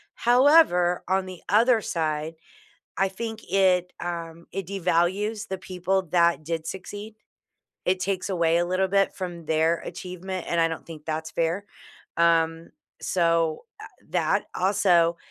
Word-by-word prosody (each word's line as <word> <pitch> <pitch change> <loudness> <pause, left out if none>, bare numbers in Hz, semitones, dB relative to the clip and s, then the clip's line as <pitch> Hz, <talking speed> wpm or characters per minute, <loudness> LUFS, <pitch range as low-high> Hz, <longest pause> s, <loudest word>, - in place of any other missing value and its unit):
However, 240 - +4
on 190 0 +1
the 185 -2 -9
other 225 +2 +4
side, 155 -2 -2 0.6
I 195 0 +3
think 220 +3 -6
it, 185 -2 +3
um, 170 -1 -6
it 195 -2 -4
devalues 195 +4 0
the 190 - -4
people 185 +1 -1
that 170 -3 +3
did 165 0 -3
succeed. 205 +4 -7 0.7
It 185 +1 +1
takes 190 +1 -2
away 170 -2 +2
a 175 - +1
little 185 +2 +1
bit 195 +1 +2
from 175 -3 -6
their 160 +2 +2
achievement, 185 0 -6
and 170 - +1
I 165 - +4
don't 165 - -6
think 155 -2 -11
that's 160 0 -3
fair. 170 +5 -1 0.5
Um, 165 -1 +2 0.3
so, 165 -3 +1 0.2
eh, - - -8 0.3
that - - +1
also 180 -3 +3
180 Hz, 140 wpm, -25 LUFS, 165-195 Hz, 0.7 s, However